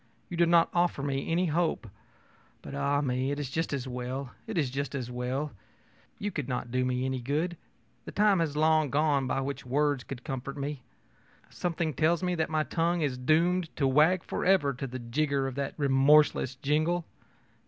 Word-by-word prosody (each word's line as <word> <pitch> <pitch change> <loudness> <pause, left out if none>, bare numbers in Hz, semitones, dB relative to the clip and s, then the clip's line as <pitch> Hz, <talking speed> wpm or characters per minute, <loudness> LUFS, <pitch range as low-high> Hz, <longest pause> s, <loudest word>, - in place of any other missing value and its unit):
You 175 - -5
do 170 0 +4
not 170 0 +4
offer 175 -5 +1
me 135 +1 -2
any 175 +2 +2
hope. 160 -6 0 0.8
But, - - -8
ah 140 0 +1
me, 130 -1 0
it 145 +1 -2
is 140 -3 -4
just 165 +3 -1
as 135 -2 -3
well 125 +1 -4 0.2
it 220 -4 -4
is 140 -6 +1
just 140 +1 -3
as 125 -3 -4
well. 125 +4 -2 0.7
You 205 0 -3
could 145 -7 -4
not 125 -1 -3
do 130 +1 +1
me 125 0 0
any 130 -1 -2
good. 155 +8 -1 0.5
The - - -7
time 205 -3 +3
has 155 -3 -1
long 155 -1 +3
gone 145 -1 +2
by 135 - 0
when 140 +1 -2
words 145 +1 +1
could 125 -2 -8
comfort 135 0 -5
me. 140 -1 -4 0.7
Something 170 -3 -2
tells 165 +4 +2
me 180 0 +1
that 160 -3 -1
my 155 -1 +1
tongue 170 +2 0
is 140 -4 0
doomed 165 +6 +2
to 140 - +1
wag 155 +7 +4
forever 180 -7 +2
to 135 +2 -5
the 130 +1 -6
jigger 135 +3 -1
of 135 - -3
that 140 +1 -3
remorseless 140 -1 +4
jingle. 155 +5 0
145 Hz, 190 wpm, -29 LUFS, 130-165 Hz, 0.8 s, do